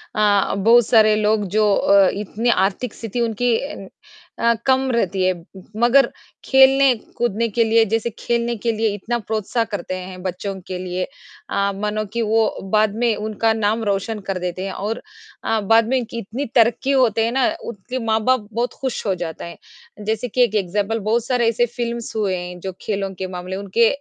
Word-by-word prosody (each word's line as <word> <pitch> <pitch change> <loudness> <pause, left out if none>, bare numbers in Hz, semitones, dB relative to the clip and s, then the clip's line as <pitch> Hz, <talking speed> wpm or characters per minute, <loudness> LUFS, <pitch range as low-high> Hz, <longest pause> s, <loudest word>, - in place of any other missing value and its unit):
अ, 205 -2 +3
बहुत 230 +4 +5
सारे 215 -3 +5
लोग 215 0 +1
जो 210 -1 +4
अ, 200 -1 +5
इतनी 210 +4 -2
आर्थिक 205 +3 +1
स्थिति 230 +1 -4
उनकी 235 +1 +1
अ 280 -9 -7 0.5
अ, 235 0 +4
कम 265 0 +2
रहती 195 -5 0
है, 185 0 +3 0.4
मगर 245 +4 +5 0.4
खेलने-कूदने 260 -4 +3
के 235 - +4
लिए 225 0 +4
जैसे 225 +2 -1
खेलने 235 0 0
के 230 +2 -1
लिए 225 0 0
इतना 220 +4 -2
प्रोत्साह 220 +1 -1
करते 185 -1 -3
हैं 185 0 -8
बच्चों 190 +2 -3
के 185 - -4
लिए। 180 0 -3 0.5
अ, 200 0 0
मानो 210 +1 -2
की 235 - -1
वो 220 0 +1 0.2
बाद 215 -1 +3
में 230 -2 +3
उनका 215 +1 0
नाम 220 +1 0
रोशन 205 +2 -1
कर 195 - 0
देते 180 +1 -4
हैं 195 - -3
और 215 +3 -4 0.4
अ, 225 - +1
बाद 225 +2 +3
में 260 - +1
इनकी 235 -2 -4
इतनी 230 +7 -4
तरक्की 240 +3 +3
होते 230 -5 +3
हैं 230 - -1
ना, 265 +2 +2 0.2
उनके 235 +4 -5
माँ-बाप 220 +1 +1
बहुत 235 +3 -1
खुश 260 -4 -3
हो 195 - +2
जाते 170 -3 -6
हैं। 170 +4 -14
जैसे 220 +3 -1
कि 250 +2 0
एक 220 -3 0
एग्ज़ाम्पल, 205 +3 0
बहुत 220 +3 0
सारे 245 -2 +1
ऐसे 235 +1 +2
फ़िल्म्स 235 -2 -4
हुए 205 -4 0
हैं 180 0 -7
जो 190 +2 -5
खेलों 195 -2 -3
के 185 +1 -4
मामले 180 0 -6
उनके 200 +4 +2
220 Hz, 185 wpm, -21 LUFS, 200-235 Hz, 0.5 s, बहुत